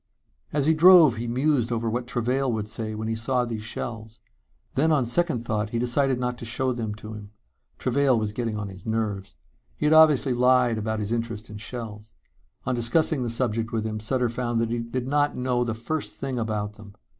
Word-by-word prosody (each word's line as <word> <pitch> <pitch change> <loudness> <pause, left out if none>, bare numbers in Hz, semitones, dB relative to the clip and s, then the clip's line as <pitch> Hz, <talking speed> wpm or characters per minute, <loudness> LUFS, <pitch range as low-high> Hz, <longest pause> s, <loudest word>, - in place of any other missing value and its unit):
As 145 -2 0
he 160 - +5
drove 160 -6 +7
he 120 +1 -3
mused 125 0 +1
over 115 0 -1
what 120 +2 -2
Travail 125 +3 0
would 110 -2 -2
say 110 0 -5
when 110 +1 -4
he 115 - -1
saw 125 +3 0
these 115 -2 -4
shells. 110 0 -6 0.5
Then 155 +4 +2
on 140 -5 +3
second 125 -1 0
thought, 105 -1 -1
he 115 - -2
decided 125 +2 +1
not 125 -1 -2
to - - -8
show 125 +2 0
them 110 -3 -4
to 110 +1 -9
him. 105 -1 -9 0.5
Travail 130 0 +2
was 110 -1 -2
getting 115 -2 -2
on 105 -1 -4
his 95 -2 -11
nerves. 105 -3 -2 0.4
He - - -3
had 150 - +4
obviously 150 -4 +6
lied 125 -2 +3
about 110 0 -2
his 105 +1 -3
interest 115 -2 -3
in 105 - -7
shells. 110 -1 -7 0.5
On 125 - 0
discussing 130 +5 +1
the 120 - -1
subject 115 -1 -1
with 110 -2 -1
him 110 -1 -3
Sutter 125 +3 0
found 120 0 -2
he 120 - -1
did 120 +2 -4
not 145 +1 +1
know 125 -1 0
the 115 -2 -2
first 145 +7 -3
thing 135 -3 -4
about 105 -2 -3
them. 105 -2 -13
120 Hz, 205 wpm, -25 LUFS, 110-130 Hz, 0.5 s, drove